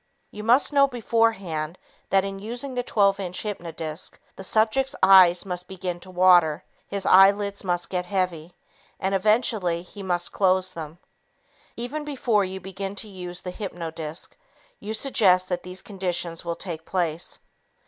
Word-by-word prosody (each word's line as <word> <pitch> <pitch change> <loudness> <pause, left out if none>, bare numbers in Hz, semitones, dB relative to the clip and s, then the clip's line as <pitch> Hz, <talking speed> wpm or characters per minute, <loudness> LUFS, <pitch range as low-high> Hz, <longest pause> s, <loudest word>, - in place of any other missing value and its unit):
You 210 - -8 0.3
know 280 -1 +5
beforehand 210 - 0 0.3
that 195 -1 +4
in 195 0 -5
using 245 +6 -3
the 250 - -1
12 200 -4 +2
inch 185 -1 -4
hypnodisc, 165 -5 -5 0.2
the 190 - -9
subject's 225 +7 +1
eyes 185 -1 +7
must 180 -1 -3
begin 180 -2 -5
to 185 - -12
water, 175 -4 +4 0.2
his 200 -1 -4
eyelids 200 +2 +5
must 175 -2 -1
get 180 -1 -2
heavy, 180 -3 -2 0.4
and 190 +1 -1
eventually 195 -4 +1
he 200 +3 -11
must 175 -2 -2
close 185 -1 +2
them. 160 -1 -7 0.8
Even 255 +6 -4
before 250 -8 +1
you 190 0 -5
begin 195 +1 -6
to 215 - -7
use 180 -3 -8
the 180 - -6
hypnodisc, 165 -5 -5 0.5
you 220 +1 -4
suggest 185 -7 +3
that 180 -1 -1
these 180 +1 -8
conditions 180 -4 -3
will 170 -1 -3
take 170 -2 -6
place. 170 -2 -2
190 Hz, 150 wpm, -25 LUFS, 175-205 Hz, 0.8 s, eyes